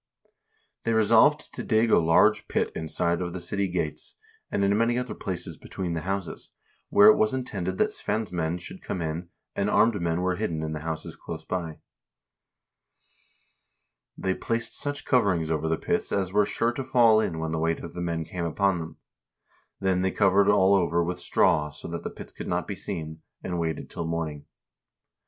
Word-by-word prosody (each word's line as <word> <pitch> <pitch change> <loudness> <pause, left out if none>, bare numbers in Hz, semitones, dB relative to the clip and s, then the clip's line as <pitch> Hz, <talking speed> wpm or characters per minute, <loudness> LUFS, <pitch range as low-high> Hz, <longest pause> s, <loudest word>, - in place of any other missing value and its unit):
They 115 - +1
resolved 115 +7 +4
to - - -5
dig 110 0 +2
a - - +6
large 80 0 +4
pit - - 0
inside 85 +2 -1
of 85 -1 -3
the 95 - -4
city 100 +2 -1
gates, 85 -4 -3 0.3
and 100 - 0
in 100 +1 +3
many 115 +2 +2
other 125 0 -2
places 85 -3 -5
between 90 -3 -5
the 80 - -2
houses, 95 0 -4 0.4
where 105 - +7
it 110 - +6
was 110 +4 +2
intended 95 -8 -3
that - - +2
Svein's 110 -3 -2
men 85 -1 -1
should 85 - -9
come - - -4
in, 85 +1 -4 0.3
and 100 +1 0
armed 110 -3 +3
men 85 0 0
were 90 -1 0
hidden 85 -7 -2
in 80 0 -3
the 75 - -4
houses 80 +1 -5
close - - -8
by. 85 -4 -4 2.4
They 95 - 0
placed 115 +4 -2
such 145 0 -2
coverings 95 - +2
over 80 0 0
the 80 - +1
pits - - -1
as 95 -2 -1
were 105 0 +4
sure 115 +1 +1
to 135 +3 -4
fall 120 -4 +5
in 85 -7 -1
when 80 0 -3
the 80 - -1
weight 80 +1 0
of 85 - -8
the 90 - -5
men 85 -2 -2
came 85 +1 -4
upon 95 +2 +1
them. 80 -1 -7 0.8
Then 95 -1 +1
they 95 - +2
covered 100 +1 +3
all 100 -1 +5
over 85 -3 +2
with 90 +1 -3
straw, 75 -3 +2
so 75 +2 -9
that 85 0 -4
the - - -4
pits - - -10
could - - -8
not 90 -2 -1
be 100 - -4
seen, 80 -5 -6 0.2
and 90 -2 -3
waited 80 -3 -2
till 85 - -5
morning. 80 -3 -4
90 Hz, 190 wpm, -26 LUFS, 80-105 Hz, 2.4 s, where